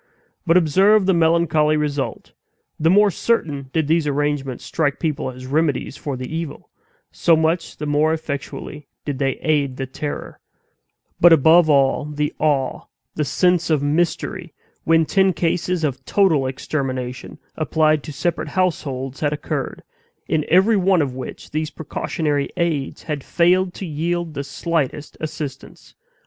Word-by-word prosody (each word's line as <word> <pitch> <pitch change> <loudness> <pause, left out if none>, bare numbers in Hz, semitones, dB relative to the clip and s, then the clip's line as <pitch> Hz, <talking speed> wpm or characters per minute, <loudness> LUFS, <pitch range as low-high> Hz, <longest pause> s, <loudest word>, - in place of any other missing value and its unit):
But 165 +2 +5
observe 190 +5 +4
the 190 - +3
melancholy 160 -2 +3
result: 145 -2 -3 0.5
the 160 +1 +3
more 205 +2 +5
certain 150 - -1
did 160 0 +1
these 160 -1 +2
arrangements 145 -3 -2
strike 145 -4 0
people 155 -4 -2
as 130 0 -9
remedies 145 -1 0
for 140 -3 -5
the 130 - -5
evil, 165 -3 -6 0.4
so 165 - +3
much 160 +2 0
the 150 - -5
more 150 +2 +2
effectually 150 -1 -5 0.2
did 140 -2 -3
they 135 -1 +1
aid 145 -4 0
the 135 - -3
terror, 145 +3 -6 0.8
but, 175 - +7
above 160 +2 +6
all, 140 0 +3
the 150 0 -2
awe, 140 -4 0 0.3
the 155 - -1
sense 175 +4 +1
of 150 -3 +2
mystery, 170 +3 -1 0.3
when 165 0 +4
ten 190 +2 +3
cases 175 0 -1
of 140 -4 -2
total 160 -10 +2
extermination, 130 -2 -4 0.2
applied 155 -1 +2
to 150 - -8
separate 170 +3 -2
households, 140 -6 -2
had 145 -2 0
occurred, 150 0 -4 0.4
in 155 -2 0
every 190 +6 +5
one 185 -3 +3
of 135 -3 -4
which 130 -1 -8
these 155 0 -2
precautionary 150 -2 -2
aids 160 -6 -1
had 150 -3 -4
failed 180 +2 +2
to 195 - -6
yield 170 +1 -2
the 140 - -4
slightest 150 0 -3
assistance. 150 -3 -7
155 Hz, 145 wpm, -21 LUFS, 140-170 Hz, 0.8 s, but